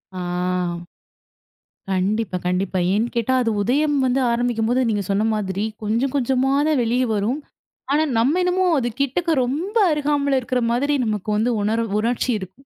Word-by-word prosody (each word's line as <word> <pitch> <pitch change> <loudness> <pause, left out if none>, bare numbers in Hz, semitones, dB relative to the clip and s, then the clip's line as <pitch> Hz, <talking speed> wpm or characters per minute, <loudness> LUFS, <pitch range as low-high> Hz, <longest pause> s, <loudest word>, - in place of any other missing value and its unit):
ஆ - - -4 1.7
கண்டிப்பா, 190 +1 0
கண்டிப்பா. 185 +1 0
ஏன்னு 215 +4 +1
கேட்டா 235 +2 +1
அது 230 -2 0
உதயம் 290 +7 +1
வந்து 255 +1 +1
ஆரம்பிக்கும்போது 240 +1 0
நீங்கச் 205 -3 -2
சொன்ன 200 +2 +1
மாதிரி 195 -1 -2 0.2
கொஞ்சம் 230 +5 0
கொஞ்சமா 265 0 +1 0.2
தான் 305 -4 +2
வெளிய 240 +3 +1
வரும். 220 +8 -1 0.5
ஆனா 305 +2 +3
நம்ம 270 +10 +2
என்னமோ 365 +1 +1
அது 240 -2 -1
கிட்டக்க 295 +2 +1
ரொம்ப 335 - -2
அருகாமைல 285 -2 +1
இருக்கிற 250 0 -1
மாதிரி 280 +5 +1
நமக்கு 215 -2 -3
வந்து 230 +3 +1
உணர்வு 225 +2 0
உணர்ச்சி 240 +3 -1
இருக்கும். 190 +8 -11
245 Hz, 145 wpm, -21 LUFS, 215-275 Hz, 1.7 s, ஆனா